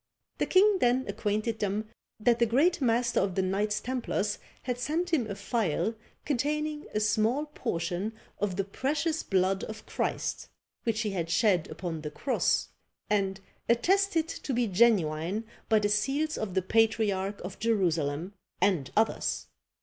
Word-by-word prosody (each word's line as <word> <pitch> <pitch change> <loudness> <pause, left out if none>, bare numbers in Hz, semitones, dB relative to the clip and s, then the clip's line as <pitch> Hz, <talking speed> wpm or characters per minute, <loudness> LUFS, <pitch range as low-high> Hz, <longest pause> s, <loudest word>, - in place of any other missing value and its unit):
The - - +1
king 390 +1 +5
then 250 0 +3
acquainted 215 +2 -1
them 205 +1 -1 0.3
that 235 +2 +3
the 235 - +4
great 295 +9 +3
master 235 -1 +2
of 190 -2 0
the 190 - +2
Knights 205 +3 0
Templars 230 -5 -2 0.2
had 250 -1 -2
sent 330 +7 -1
him 245 -9 +2
a 200 - -3
phial 210 0 0 0.3
containing 300 +2 -1
a - - +3
small 220 +7 +2
portion 180 - -3 0.3
of 200 -3 -1
the 195 - 0
precious 300 - -1
blood 190 0 +1
of 220 - -8
Christ - - -2 0.4
which 225 -2 +1
he 215 -2 -1
had 170 -4 -2
shed 175 0 +2
upon 165 0 -5
the 150 - -4
cross; 260 - 0 0.4
and 195 -1 +1 0.3
attested 340 +7 +3
to 280 - -4
be 245 0 +2
genuine 190 -3 +2 0.3
by 220 - +5
the 210 -1 +2
seals 275 +9 +1
of 195 -4 -4
the 190 - +2
patriarch 205 -2 +1
of 185 +1 -7
Jerusalem 175 -6 0 0.3
and 175 -10 +2
others! 220 +1 +1
215 Hz, 150 wpm, -29 LUFS, 190-250 Hz, 0.4 s, king